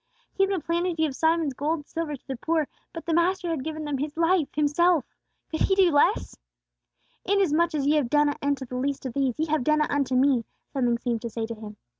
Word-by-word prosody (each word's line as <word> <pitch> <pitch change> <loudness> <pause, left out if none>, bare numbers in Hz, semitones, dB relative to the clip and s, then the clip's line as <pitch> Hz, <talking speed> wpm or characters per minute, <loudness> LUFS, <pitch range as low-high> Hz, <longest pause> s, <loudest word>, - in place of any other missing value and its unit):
He - - -1
had 390 - +4
been 380 -6 -1
planning 345 +1 0
to 320 - -2
give 290 -4 -1
Simon's 320 -2 +1
gold 295 +5 -1
and 295 -3 -9
silver 320 -2 -4
to 265 - -18
the 265 - -3
poor; 315 +4 0 0.2
but 330 - -8
the 335 - 0
Master 350 +1 +1
had 305 -5 -2
given 310 0 -5
them 290 -2 -2
His 295 +2 -4
life, 335 -2 +3
Himself! 305 +1 +3 0.5
Could 315 - -2
he 385 - +3
do 380 -3 +5
less? 285 - +2 0.9
"Inasmuch 340 -4 +2
as 280 -2 0
ye 300 +2 +3
have 270 -6 0
done 295 +2 +4
it 290 - -3
unto 280 -1 -1
the 250 0 -6
least 275 +1 -2
of 255 - -4
these, 270 -3 0
ye 315 - 0
have 310 -4 0
done 305 +3 +3
it 300 - 0
unto 275 -3 0
me," 260 -2 +3 0.3
something 245 -4 +1
seemed 235 -1 -2
to 235 - -4
say 225 0 -3
to 230 - -5
him. 215 -1 -10
295 Hz, 245 wpm, -26 LUFS, 265-330 Hz, 0.9 s, do